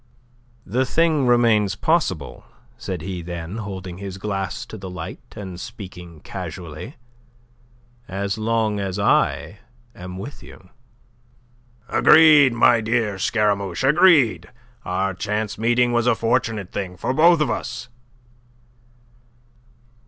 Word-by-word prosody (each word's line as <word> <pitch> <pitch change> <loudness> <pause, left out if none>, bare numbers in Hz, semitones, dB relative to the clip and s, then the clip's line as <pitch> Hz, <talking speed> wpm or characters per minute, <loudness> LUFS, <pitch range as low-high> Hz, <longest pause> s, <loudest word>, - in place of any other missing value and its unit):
"The 130 +3 0
thing 155 0 +1
remains 115 -5 +3
possible," 105 - -1 0.3
said 95 -8 -6
he 90 -1 -5
then, 85 +3 -6
holding 95 -4 -7
his 95 -1 -7
glass 95 -2 -4
to - - -10
the 95 -3 -8
light, 90 -3 -7 0.2
and 95 -4 -8
speaking 90 -7 -10
casually, 90 - -8 1.1
"as 100 +1 -3
long 110 -1 0
as 95 -1 -3
I 100 0 +1 0.3
am 90 0 -9
with 130 +9 -8
you." 95 - -15 1.2
"Agreed, 150 -4 +6
my 120 -1 +4
dear 110 -3 -1
Scaramouche, 100 0 0
agreed. 135 - +4 0.4
Our 95 +2 -1
chance 105 +3 -3
meeting 120 +2 +2
was 120 0 +1
a 120 - +4
fortunate 115 -4 -1
thing 90 -3 -5
for 130 - -2
both 165 +3 +5
of 150 - +1
us." 125 -1 -5
105 Hz, 115 wpm, -22 LUFS, 95-120 Hz, 1.2 s, Agreed